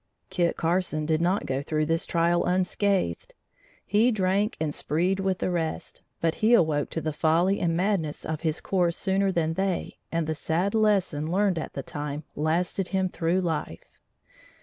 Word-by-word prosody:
Kit 175 -2 +1
Carson 165 -2 0
did 160 +1 +1
not 180 +4 +1
go 135 +1 -1
through 155 +1 -1
this 165 +2 -1
trial 170 0 +2
unscathed. 185 - 0 0.5
He 210 +5 +3
drank 200 -1 +1
and 155 -2 -1
spreed 180 +7 0
with 190 -1 0
the 185 - -1
rest, 165 -2 -3 0.2
but 165 -1 +1
he 225 +3 +6
awoke 155 -7 +2
to 165 - -3
the 155 -1 -2
folly 165 +6 +2
and 165 -1 0
madness 180 -5 -1
of 160 -1 -3
his 160 -1 -1
course 175 -3 0
sooner 195 0 +1
than 165 -3 0
they 190 +1 -2
and 165 -1 0
the 160 - -1
sad 165 +6 -1
lesson 195 -8 +1
learned 190 -2 +2
at - - -6
the - - -5
time 145 0 -5
lasted 170 +5 0
him 190 -1 0
through 175 +2 0
life. 165 -4 -3
170 Hz, 170 wpm, -26 LUFS, 160-190 Hz, 0.5 s, he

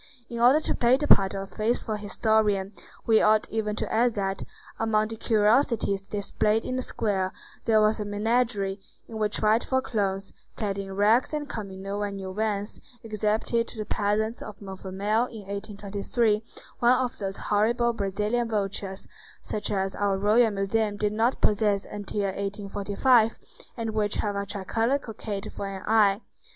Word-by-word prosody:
In 235 - -4
order 250 +6 +6
to - - 0
play 245 +2 +4
the 295 +1 -2
part 195 -5 +5
of 195 - -3
a - - -7
faithful 220 +2 -1
historian, 210 -1 +1 0.3
we 220 -1 +5
ought 215 0 +4
even 215 -1 -1
to - - -3
add 235 +1 +3
that, 195 -1 -2 0.4
among 215 -1 +1
the 225 - -5
curiosities 220 -2 +2
displayed 210 +2 0
in 255 - -2
the 255 - -1
square, 195 -6 -1 0.3
there 220 -1 +4
was 215 +1 +2
a - - -1
menagerie, 205 -1 0 0.3
in 220 -1 -7
which 210 0 0
frightful 225 +5 +2
clowns, 195 -6 -2 0.2
clad 200 -2 -2
in 195 -1 -6
rags 220 +8 +3
and 295 -1 -3
coming 195 -6 -6
no 200 +1 -3
one 205 -1 -2
knew 190 -1 -6
whence, 210 0 -2 0.2
exhibited 220 +2 0
to - - -8
the 215 - -3
peasants 215 +2 -1
of 210 - -9
Montfermeil 200 +3 -1
in 225 -3 -9
1823 205 +2 -1 0.4
one 245 -1 +5
of 255 -2 -2
those 195 -1 -3
horrible 235 +3 +1
Brazilian 210 +3 -1
vultures, 195 -2 -2 0.4
such 210 -1 -2
as 195 -1 -1
our 200 -1 0
Royal 215 +4 +4
Museum 205 +1 0
did 210 0 0
not 230 +4 +1
possess 205 -1 +2
until 205 0 -4
1845, 200 +4 +1 0.4
and 225 -1 -2
which 210 -1 0
have 205 -1 -1
a 200 0 -3
tricolored 225 +8 0
cockade 210 -3 -5
for 200 - -5
an 195 -1 -6
eye. 210 -1 +4
210 Hz, 165 wpm, -26 LUFS, 200-225 Hz, 0.4 s, order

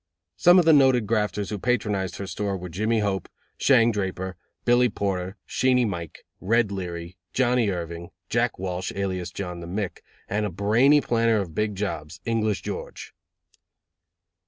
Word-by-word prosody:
Some 175 +1 +6
of 180 - +5
the 160 - +7
noted 130 -5 +5
grafters 105 -2 -1
who 105 - -3
patronized 105 -5 0
her 100 - -5
store 100 0 -3
were 90 0 -7
Jimmy 110 +6 0
Hope, 95 -3 -2 0.3
Shang 120 -4 +5
Draper, 95 -2 -3 0.3
Billy 120 +1 +4
Porter, 95 -2 -2
Sheenie 125 -1 +2
Mike, 85 -7 -5
Red 110 +1 +2
Leary, 90 -2 -5 0.2
Johnnie 125 -3 +2
Irving, 85 -2 -5 0.2
Jack 120 +2 0
Walsh, 90 0 -3
alias 95 -3 -2
John 90 -1 -6
the 85 - -8
Mick, 95 +2 -3 0.3
and 105 +2 -1
a 105 - -1
brainy 115 - +4
planner 115 -3 +2
of 90 -5 -4
big 105 +3 -1
jobs, 85 -6 -4
English 110 -3 0
George. - - -6
100 Hz, 155 wpm, -25 LUFS, 90-115 Hz, 0.3 s, the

